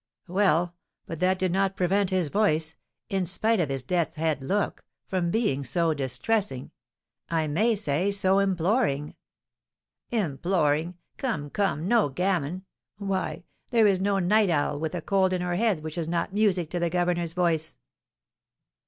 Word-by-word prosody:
"Well, 175 -2 +2 0.3
but 165 - -6
that 185 +1 +2
did 185 -1 0
not 195 +1 +1
prevent 190 +2 +1
his 185 -5 0
voice 160 -5 +1 0.4
in 190 -2 0
spite 220 +4 +1
of 160 -5 +1
his 135 -2 -2
death's 170 +4 -1
head 155 -3 -1
look 200 +8 -1 0.2
from 180 -2 -1
being 170 - 0
so 165 +5 +1
distressing, 135 - -2 0.6
I 160 -1 +1
may 215 +10 +2
say 185 -1 0
so 195 -1 +3
imploring 185 - +1 0.5
" - - -64 0.2
"Imploring! 160 +1 0 0.2
Come, 150 - -3
come, 180 -5 0
no 230 -7 +3
gammon! 180 +2 -1 0.3
Why, 195 -3 -3 0.3
there 230 -3 +4
is 195 -2 +3
no 200 0 +1
night 200 +2 +3
owl 145 -2 0
with 160 +3 -3
a 175 - -3
cold 190 -1 +2
in 180 - -1
her 180 0 -1
head 200 -6 +1
which 155 +2 -5
is 160 - -2
not 170 +2 -1
music 190 -6 +1
to 175 - -1
the 170 0 +1
governor's 175 -1 0
voice." 165 -3 0
180 Hz, 160 wpm, -26 LUFS, 160-195 Hz, 0.6 s, there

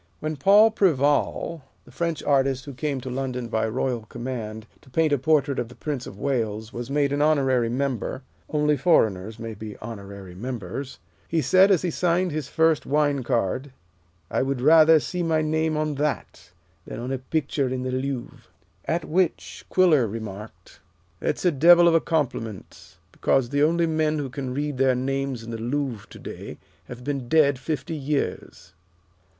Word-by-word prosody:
When 155 0 -3
Paul 205 +9 +6
Preval, 150 -2 +1 0.2
the 125 - -16
French 165 +4 -2
artist 135 -2 +1
who 140 - -7
came 140 +1 -2
to 130 - -6
London 125 -2 -3
by 110 -1 0
royal 120 +1 -1
command 115 -3 -5 0.2
to - - -19
paint 155 +3 +2
a 145 - +2
portrait 145 -1 +2
of 115 - -3
the 125 - -13
Prince 145 -5 -4
of 95 - -10
Wales, 110 -4 -2
was 120 +1 -6
made 140 0 +1
an 145 - 0
honorary 135 -6 +2
member 130 +1 -2 0.3
only 150 0 +2
foreigners 110 - +2
may 115 -1 -6
be 105 0 -8
honorary 100 -4 -9
members 125 +4 -6 0.3
he 165 - 0
said, 185 +8 +5
as 185 -4 +3
he 175 - 0
signed 180 +2 +1
his 150 -2 -3
first 160 +1 +2
wine 145 -1 +2
card, 125 +2 -1 0.6
"I - - +1
would 135 0 -1
rather 155 +3 +7
see 180 +4 -4
my 160 -2 +1
name 155 0 0
on 155 0 0
that, 140 - -3 0.4
than - - -6
on 125 +2 -4
a 135 - -2
picture 140 0 -1
in 130 0 -3
the 130 - -2
Louvre." 130 -1 -4 0.5
At 165 0 -1
which 180 +2 -1
Quiller 160 -10 +4
remarked, 105 -1 -8 0.4
"That - - -1
is - - -6
a 180 - +5
devil 170 +4 +7
of 170 - +5
a 165 - +4
compliment, 115 - -4
because 130 -3 +1
the 145 +1 0
only 170 +3 +3
men 155 -1 0
who 140 -3 -3
can 130 -1 -4
read 145 0 -3
their 130 -1 +4
names 135 -1 -2
in 115 - -8
the 115 - -5
Louvre 125 -3 -3
to - - -12
day - - -8 0.3
have 125 0 -10
been 135 -3 -3
dead 145 -4 +4
fifty 155 +3 -3
years." 140 - -3
135 Hz, 180 wpm, -24 LUFS, 120-155 Hz, 0.6 s, rather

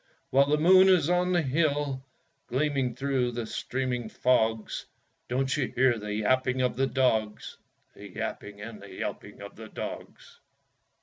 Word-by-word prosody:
While 140 +1 +5
the 150 +1 +2
moon 185 +4 +6
is 175 -3 +4
on 180 0 +2
the 175 -2 +2
hill 145 -2 0 0.4
Gleaming 135 -2 0
through 130 -2 0
the 120 -1 -3
streaming 125 -1 -3
fogs, 110 -3 0 0.4
Don't 130 +1 0
you 140 -4 0
hear 125 -2 +3
the 105 0 -6
yapping 130 +4 +1
of 125 - 0
the 135 +1 +1
dogs 110 -6 0 0.4
The - - -11
yapping 100 0 -6
and 110 -1 -8
the 100 -1 -11
yelping 95 - -6
of - - -10
the - - -10
dogs? - - -8
130 Hz, 150 wpm, -28 LUFS, 115-145 Hz, 0.4 s, moon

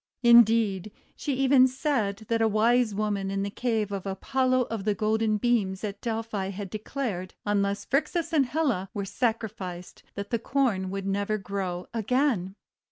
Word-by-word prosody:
Indeed, 225 -4 +5 0.2
she 285 -3 -2
even 260 0 +5
said 240 -6 -1
that 230 0 +1
a 225 - +4
Wisewoman 215 -3 +1
in 195 0 -1
the 200 - -3
cave 220 -3 -1
of 195 -1 -4
Apollo 255 +6 +1
of 220 -3 -3
the 210 0 +1
Golden 215 0 +1
Beams 205 -4 0
at 200 -1 -5
Delphi 225 -4 -3
had 195 0 -6
declared, 215 -4 -4
unless 200 -1 0
Phrixus 305 +6 0
and 280 -5 +3
Helle 245 - 0
were 200 -1 -2
sacri 225 +1 -1
ficed, 180 -3 -8
that 200 0 -6
the 235 - +1
Corn 230 -7 0
would 195 0 -4
never 200 +2 0
grow 190 -3 -4
again. 225 -4 0
215 Hz, 160 wpm, -27 LUFS, 195-245 Hz, 0.2 s, Indeed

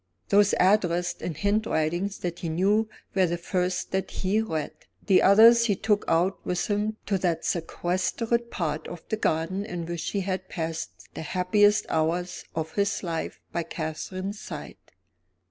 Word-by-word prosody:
Those 205 0 +5
addressed 180 -2 +2
in 165 - -3
handwritings 200 -2 0
that 175 -1 -3
he 170 - -3
knew 205 +7 +2 0.2
were 190 -2 +3
the 170 +1 -1
first 180 +1 -1
that 190 0 -1
he 200 +3 0
read. 160 -9 -3 0.3
The 190 -3 +5
others 230 +4 +7
he 205 -4 +2
took 205 +2 +1
out 175 +4 +1
with 180 -1 -1
him 210 +1 0
to 195 -2 0
that 175 -3 0
sequestered 185 +8 -1
part 155 -6 -3
of 175 -2 -8
the 220 - 0
garden 175 +1 0
in 175 -4 -5
which 170 -1 -3
he 200 - -1
had 185 0 -3
passed 160 -2 -5
the - - -6
happiest 205 +5 +3
hours 165 +3 -1
of 160 -1 -3
his 200 0 0
life 165 -2 -3
by 170 - -1
Catherine's 185 +5 -5
side. - - -7
185 Hz, 160 wpm, -26 LUFS, 170-205 Hz, 0.3 s, others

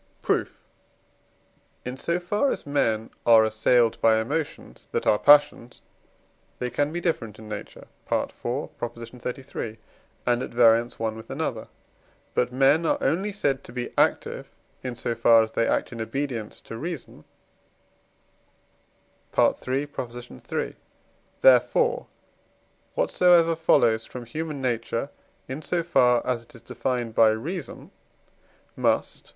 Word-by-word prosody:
Proof. - - -1 1.2
In 125 +1 -4
so 170 +6 -1
far 205 +10 0
as - - -3
men 115 -6 0
are 115 -1 +7
assailed 110 +2 +2
by 110 -1 +5
emotions 145 +8 -4
that - - -1
are 105 - +3
passions, 145 -5 +4 0.8
they 125 -1 -3
can 145 +4 0
be 170 - -3
different 115 - -2
in 110 - -11
nature 105 -1 -8 0.3
(IV. - - 0
xxxiii.), 120 -1 -6 0.5
and 120 0 +2
at - - -4
variance 115 0 +3
one 110 -1 -2
with 110 - -11
another. - - -3 0.7
But 125 0 +1
men 135 +5 +4
are - - +2
only 195 +5 0
said 140 -9 -1
to - - -12
be 120 0 -5
active, - - 0 0.3
in 125 -2 -5
so 120 0 -2
far 115 0 +5
as 110 - -5
they 115 - +1
act - - 0
in 115 -2 -6
obedience 115 -2 -4
to 115 - -8
reason 165 -2 -7 2.1
(III. - - +5
iii.); 125 -3 -4 0.7
therefore, - - +4 0.9
what - - 0
so 180 -1 +5
ever 165 -1 +5
follows 115 -8 +3
from 125 -1 -8
human 150 +2 -5
nature 115 +2 -2 0.4
in 130 +4 -5
so 170 +1 -1
far 125 -7 +3
as 125 -2 -1
it 115 - -16
is 115 - -13
defined 120 -1 -3
by 110 0 +6
reason 150 - -5 0.8
must - - 0
(III. - - -18
125 Hz, 135 wpm, -25 LUFS, 115-145 Hz, 2.1 s, are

